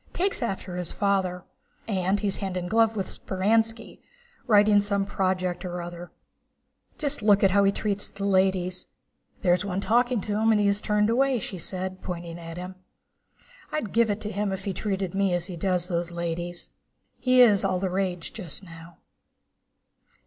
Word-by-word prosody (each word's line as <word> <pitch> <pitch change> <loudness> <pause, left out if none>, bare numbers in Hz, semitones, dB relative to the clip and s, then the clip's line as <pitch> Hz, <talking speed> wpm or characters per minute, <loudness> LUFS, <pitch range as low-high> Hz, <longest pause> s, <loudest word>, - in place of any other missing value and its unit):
Takes 385 -2 0
after 195 -5 -3
his 180 -2 -2
father. 190 -3 0 0.4
And 190 -1 +1
he's 200 -2 -1
hand 190 -2 -3
in 180 - -3
glove 225 +3 +3
with 195 -3 -1
Speránski, 225 +4 0 0.5
writing 205 -2 +5
some 200 -1 0
project 185 -2 -1
or 180 -1 -4
other. 175 0 -7 0.9
Just 290 -3 +1
look 205 -1 +4
how 200 +1 +5
he 195 - +4
treats 205 0 -1
the 200 0 -6
ladies! 185 -2 +1 0.6
There's 180 0 +3
one 195 -2 -2
talking 240 +3 +2
to 205 +2 -2
him 225 +1 +4
and 215 - +4
he 205 - +2
has 200 +1 +2
turned 210 +1 +2
away," 265 +2 +3
she 190 -4 -5
said, 185 +2 -4
pointing 170 -1 -6
at 165 0 -8
him. 180 +1 -7 0.9
"I'd 265 -10 -3
give 230 -1 +3
it 205 +1 -1
to 210 - -4
him 205 0 -1
if 190 0 -4
he 195 - -2
treated 190 -3 -2
me 195 -2 +2
as 175 -1 -1
he 180 -2 -6
does 180 0 0
those 175 -1 -2
ladies." 170 0 -4 0.2
* - - -46
"He 255 0 +5
is 210 -5 +6
all 190 -1 +1
the 185 -1 -1
rage 180 -2 -2
just 190 -3 -5
now." 165 -1 -12
195 Hz, 180 wpm, -26 LUFS, 180-210 Hz, 0.9 s, is